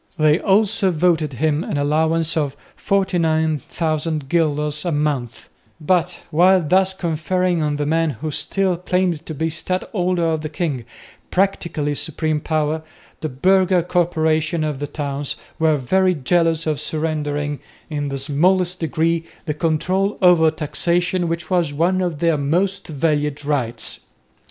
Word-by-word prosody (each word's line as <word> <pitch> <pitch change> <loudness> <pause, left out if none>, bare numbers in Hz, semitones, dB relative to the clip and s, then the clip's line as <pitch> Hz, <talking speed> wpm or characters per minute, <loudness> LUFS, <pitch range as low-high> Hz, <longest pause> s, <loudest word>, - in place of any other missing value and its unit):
They 155 +1 +4
also 200 0 +2
voted 165 -3 +1
him 155 +4 0
an - - -3
allowance 160 +3 +1
of 145 -3 -1 0.2
49,000 160 - 0
guilders 150 -2 0
a 175 - -1
month; 145 -6 -2 0.3
but, 180 +2 0
while 180 +1 +4
thus 190 +3 +3
conferring 175 +1 0
on 150 -1 0
the 145 0 -2
man 165 +2 +1
who 150 +4 -4
still 190 +3 0
claimed 180 -2 0
to 160 - -5
be 160 - -1
the 160 - -1
"Stadholder 180 +1 -1
of 160 -1 0
the 155 - -4
king" 150 -6 -3 0.4
practically 170 -6 0
supreme 155 +1 -2
power, 155 0 -1 0.4
the 155 - -3
burgher 185 +5 +3
corporations 160 -2 +1
of 150 -3 -3
the 145 - -3
towns 140 -1 -3 0.2
were 160 -2 +3
very 185 +7 +2
jealous 165 +2 +1
of 155 -2 -1
surrendering 150 -2 -2 0.3
in 145 -1 -2
the 140 0 -3
smallest 175 +6 +1
degree 165 0 0 0.2
that 150 -2 -4
control 185 +5 0
over 175 -4 +5
taxation 170 +3 -1
which 165 0 -4
was 170 -5 +1
one 180 +5 +2
of 175 -4 -1
their 165 -1 +1
most 180 +7 0
valued 150 -1 -1
rights. 120 -6 -2
160 Hz, 140 wpm, -20 LUFS, 150-175 Hz, 0.4 s, over